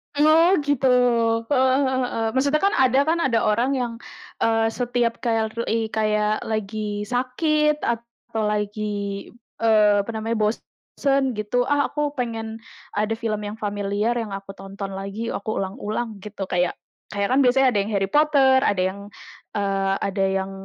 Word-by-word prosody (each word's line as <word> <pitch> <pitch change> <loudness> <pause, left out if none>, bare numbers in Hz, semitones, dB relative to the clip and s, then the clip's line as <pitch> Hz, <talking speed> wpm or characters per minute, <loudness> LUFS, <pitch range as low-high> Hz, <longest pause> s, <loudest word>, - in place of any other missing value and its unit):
Oh 315 +5 +5
gitu, 285 -2 +1 0.6
heeh 260 -1 +4
heeh 260 0 0
heeh. 225 - -1
Maksudnya 280 +3 +2
kan 400 - +3
ada 260 0 +4
kan, 325 +3 +1
ada 240 -8 +2
orang 235 +5 +2
yang, 245 -3 -2 0.5
eee, 225 0 +2
setiap 240 -1 -1
kayak 225 -3 0
flui 225 -1 -2
kayak 215 -1 +1
lagi 215 -1 -3
sakit 300 +6 0
atau 235 -1 -4
lagi, 210 -1 -3 0.3
eee, 215 -2 +4
apa 200 - -10
namanya 225 +1 -2
bosen 265 +4 -1
gitu. 230 +4 0
"Ah 290 0 +1
aku 295 -1 -2
pengen, 225 -3 -4 0.4
ada 210 +2 0
film 215 -3 -2
yang 205 +1 -6
familiar 205 +2 -1
yang 220 -3 -3
aku 195 0 -7
tonton 195 0 -7
lagi, 200 +4 -5
aku 215 +2 -3
ulang-ulang," 210 +3 -4
gitu. 200 -2 -6
Kayak 180 -1 0 0.3
kayak 200 +2 -2
kan 265 - +4
biasanya 265 0 +4
ada 210 - +1
yang 200 +2 -2
Harry 195 0 0
Potter, 285 -3 +4
ada 190 -2 +1
yang, 190 +2 -2 0.6
eee, 195 -1 0
ada 195 0 -1 0.2
yang 190 0 -6
225 Hz, 155 wpm, -23 LUFS, 205-260 Hz, 0.6 s, Oh